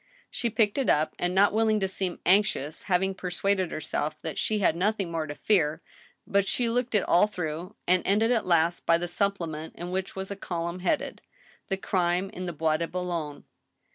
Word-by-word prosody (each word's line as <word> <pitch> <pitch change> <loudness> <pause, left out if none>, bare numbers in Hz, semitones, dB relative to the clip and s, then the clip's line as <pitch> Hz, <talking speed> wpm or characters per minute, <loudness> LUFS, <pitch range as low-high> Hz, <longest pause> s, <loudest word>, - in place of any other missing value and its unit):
She 235 - -1
picked 220 +2 +1
it 270 - +1
up, 155 +1 +2
and 175 +1 -1
not 200 +2 +5
willing 220 0 +3
to 190 - 0
seem 190 -1 -2
anxious^ 175 -6 +2
having 190 0 +1
persuaded 185 0 -1
herself 155 0 -3
that 160 -3 -4
she 215 - +1
had 190 -5 +2
nothing 195 0 0
more 160 -2 -2
to 145 - -6
fear, 160 -7 +2 0.5
but 200 0 +1
she 240 +4 0
looked 240 0 0
it 205 - +3
all 180 +4 +4
through, 175 -1 -5
and 180 0 +3
jended 220 +4 +2
at 220 - -1
last 170 0 +2
by 165 - +5
the 175 +1 -3
supplement 170 -4 -2
in 175 +1 -6
which 190 0 -3
was 190 +1 -5
a - - -3
column 170 -2 -4
headed 190 - -1 0.2
" - - -30
The 195 - 0
Crime 185 0 0
in 185 -4 -6
the 175 - -3
Bois 155 0 +1
de 170 +1 -2
Boulogne." 170 -5 -4
185 Hz, 200 wpm, -27 LUFS, 170-200 Hz, 0.5 s, not